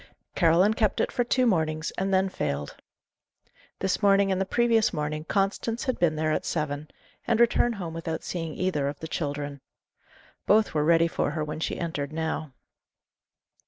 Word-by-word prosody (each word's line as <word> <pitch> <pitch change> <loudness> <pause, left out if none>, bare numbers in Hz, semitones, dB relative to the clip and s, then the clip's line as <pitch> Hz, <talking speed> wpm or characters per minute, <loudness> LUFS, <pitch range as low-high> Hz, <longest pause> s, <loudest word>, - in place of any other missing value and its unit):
Caroline 175 +4 +4
kept 220 -2 +1
it - - +1
for 245 - +1
two 250 +1 +2
mornings 160 -6 0
and 195 +1 -2
then 190 0 +3
failed. 70 - -3 1.1
This 190 +2 0
morning 200 -1 +4
and 190 0 0
the 190 - -1
previous 230 0 +3
morning 155 -1 -3
Constance 205 +5 -1
had 255 -1 -2
been 165 -3 +2
there 155 0 0
at - - 0
seven, 150 -2 -3 0.4
and 230 -1 +2
returned 235 0 +3
home 175 -5 -5
without 165 -1 -4
seeing 165 -3 -4
either 165 -7 0
of 140 +1 -4
the 160 - -6
children. 145 -3 -4 0.9
Both 215 +1 +4
were 150 -1 +1
ready 165 +1 +4
for - - -1
her 155 - -2
when 150 +1 -5
she - - -2
entered 150 -4 -3
now. 160 -2 -3
165 Hz, 170 wpm, -26 LUFS, 155-200 Hz, 1.1 s, Caroline